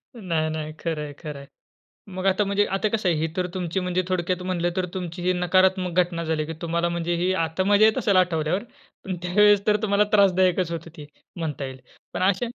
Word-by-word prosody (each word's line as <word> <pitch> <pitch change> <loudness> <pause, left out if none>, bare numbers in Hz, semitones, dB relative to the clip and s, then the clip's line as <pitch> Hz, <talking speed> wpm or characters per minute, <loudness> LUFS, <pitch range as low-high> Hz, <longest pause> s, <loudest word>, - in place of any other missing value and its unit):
नाही-नाही. 155 -6 -2
खरं 160 -3 -3
आहे, 145 - -7
खरं 150 -4 -7
आहे. 140 - -12 0.7
मग 185 +1 -3
आता 195 +2 +3
म्हणजे 200 +1 +1
आता 215 - 0
कसं 210 -3 -1
आहे? 170 - +2
ही 160 - 0
तर 180 -1 0
तुमची 180 0 -2
म्हणजे 180 0 0
थोडक्यात 180 0 -1
म्हटलं 175 -1 -1
तर 185 - 0
तुमची 180 -1 -5
ही 180 +1 +2
नकारात्मक 185 0 +2
घटना 170 -1 -1
झाली, 160 -1 -1
की 165 - -5
तुम्हाला 170 +1 0
म्हणजे 170 0 -2
ही 185 +1 +2
आता 160 +4 -2
मजा 205 +2 +5
येत 220 +4 +2
असेल 205 -5 +2
आठवल्यावर 180 +1 +1 0.4
पण 185 -2 -3
त्यावेळेस 205 +3 +4
तर 210 0 +4
तुम्हाला 205 0 +3
त्रासदायकच 185 -3 +3
होत 165 0 -5
ते 150 - -9 0.3
म्हणता 155 -4 -4
येईल. 130 -1 -7 0.3
पण - - -2
अशा 195 +5 +2
180 Hz, 205 wpm, -24 LUFS, 165-190 Hz, 0.7 s, मजा